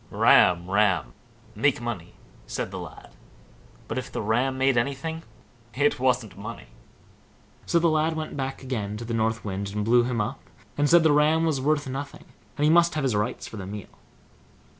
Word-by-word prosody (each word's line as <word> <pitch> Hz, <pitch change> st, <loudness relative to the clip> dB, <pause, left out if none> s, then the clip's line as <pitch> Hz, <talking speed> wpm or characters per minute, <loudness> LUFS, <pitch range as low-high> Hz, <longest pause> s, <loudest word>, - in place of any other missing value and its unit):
"Ram, 85 Hz, -1 st, +4 dB
ram! 95 Hz, -, +1 dB, 0.4 s
make -, -, +1 dB
money!" -, -, -6 dB, 0.3 s
said -, -, -4 dB
the -, -, -5 dB
lad; -, -, -10 dB, 0.8 s
but -, -, -2 dB
if -, -, -8 dB
the -, -, -4 dB
Ram 125 Hz, +5 st, +1 dB
made 135 Hz, 0 st, +2 dB
anything, 140 Hz, +6 st, -2 dB, 0.5 s
it 145 Hz, +1 st, +2 dB
wasn't 125 Hz, -4 st, 0 dB
money. -, -, -9 dB, 1.0 s
So -, -, +2 dB
the 170 Hz, 0 st, +3 dB
lad 160 Hz, 0 st, +1 dB
went 155 Hz, -1 st, -5 dB
back 135 Hz, -1 st, -4 dB
again 105 Hz, -6 st, -3 dB
to 115 Hz, -, -7 dB
the 115 Hz, -, -4 dB
North 115 Hz, 0 st, -1 dB
Wind, 100 Hz, 0 st, -3 dB
and 105 Hz, 0 st, -1 dB
blew 120 Hz, +2 st, +5 dB
him 120 Hz, -1 st, -2 dB
up, 110 Hz, +6 st, -2 dB, 0.4 s
and 145 Hz, 0 st, +1 dB
said 170 Hz, -1 st, +6 dB
the 160 Hz, -, +5 dB
ram 155 Hz, +2 st, +3 dB
was 150 Hz, -5 st, 0 dB
worth 150 Hz, +1 st, +1 dB
nothing, 135 Hz, +2 st, -6 dB, 0.3 s
and 145 Hz, -, -1 dB
he 150 Hz, -, +5 dB
must 170 Hz, -1 st, +4 dB
have 150 Hz, -, -1 dB
his 130 Hz, -5 st, +1 dB
rights 105 Hz, +3 st, -2 dB
for 110 Hz, -, -9 dB
the 95 Hz, -2 st, -6 dB
meal. 105 Hz, 0 st, -7 dB
130 Hz, 185 wpm, -25 LUFS, 110-150 Hz, 1.0 s, said